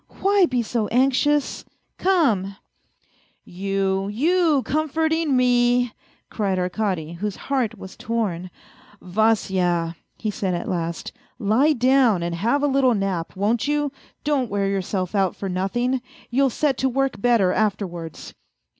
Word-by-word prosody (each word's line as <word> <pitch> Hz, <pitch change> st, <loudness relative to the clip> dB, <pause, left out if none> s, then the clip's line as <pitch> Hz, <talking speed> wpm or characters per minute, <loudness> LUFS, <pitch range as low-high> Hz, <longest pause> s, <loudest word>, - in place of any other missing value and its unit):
" -, -, -19 dB
Why 395 Hz, -2 st, +4 dB
be 250 Hz, -4 st, 0 dB
so 220 Hz, -1 st, -1 dB
anxious? 270 Hz, +3 st, +1 dB, 0.4 s
Come! 235 Hz, -, +2 dB, 0.3 s
" -, -, -41 dB
" -, -, -36 dB, 0.2 s
You, 195 Hz, +1 st, -1 dB
you 305 Hz, -, +2 dB
comforting 315 Hz, 0 st, 0 dB
me! 245 Hz, -1 st, +3 dB, 0.2 s
" -, -, -37 dB
cried 195 Hz, -4 st, -1 dB
Arkady, 180 Hz, -3 st, -2 dB
whose 205 Hz, -1 st, -2 dB
heart 245 Hz, -5 st, -2 dB
was 190 Hz, -1 st, -10 dB
torn. 200 Hz, -6 st, -2 dB, 0.3 s
" 205 Hz, -, -25 dB
Vasya," 180 Hz, -4 st, +1 dB, 0.2 s
he 215 Hz, -, -2 dB
said 190 Hz, -3 st, -2 dB
at 170 Hz, -, -4 dB
last, 170 Hz, -2 st, -3 dB, 0.2 s
" -, -, -41 dB
lie 280 Hz, +8 st, +4 dB
down 250 Hz, -7 st, +3 dB
and 170 Hz, 0 st, -2 dB
have 235 Hz, +12 st, 0 dB
a -, -, +4 dB
little 265 Hz, -3 st, +3 dB
nap, 195 Hz, -4 st, -2 dB
won't 215 Hz, +6 st, 0 dB
you? 295 Hz, -1 st, 0 dB, 0.3 s
Don't 280 Hz, -5 st, 0 dB
wear 200 Hz, 0 st, 0 dB
yourself 190 Hz, -1 st, -2 dB
out 195 Hz, -3 st, +1 dB
for 195 Hz, -, -5 dB
nothing 195 Hz, +8 st, -1 dB
I 260 Hz, -, -1 dB, 0.3 s
You'll 270 Hz, +2 st, +3 dB
set 270 Hz, +2 st, 0 dB
to 265 Hz, -, +2 dB
work 270 Hz, -3 st, -1 dB
better 225 Hz, -6 st, +3 dB
afterwards." 180 Hz, -7 st, -3 dB
220 Hz, 155 wpm, -23 LUFS, 190-270 Hz, 0.4 s, Why